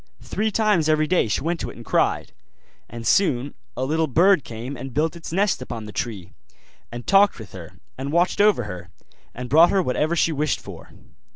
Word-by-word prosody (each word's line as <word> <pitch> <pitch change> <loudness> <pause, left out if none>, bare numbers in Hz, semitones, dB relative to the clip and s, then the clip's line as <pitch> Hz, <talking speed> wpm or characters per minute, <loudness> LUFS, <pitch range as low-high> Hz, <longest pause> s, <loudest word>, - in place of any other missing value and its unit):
Three 220 +1 -1
times 210 -7 +2
every 155 0 +3
day 175 -5 +2
she 105 - -1
went 170 +2 -2
to - - -4
it - - -11
and 115 - -12
cried; - - 0 0.6
and 115 0 -8
soon 140 - +2 0.2
a 130 - -1
little 160 +3 0
bird 170 +3 +4
came 120 +4 -7
and 130 0 -8
built 160 +2 0
its 170 -1 -8
nest 195 -3 +1
upon 115 -3 -6
the 105 - -8
tree, 105 -6 -5 0.6
and 120 0 -7
talked 200 +1 +4
with 110 -5 -11
her, 85 -4 -10 0.3
and 135 +2 -4
watched 175 +4 +2
over 205 -11 +4
her, 90 -4 -8 0.5
and 125 +1 -6
brought 160 +7 +6
her 195 -2 +2
whatever 155 +4 0
she 165 - +2
wished 150 -1 -1
for. - - -11
150 Hz, 200 wpm, -23 LUFS, 120-175 Hz, 0.6 s, brought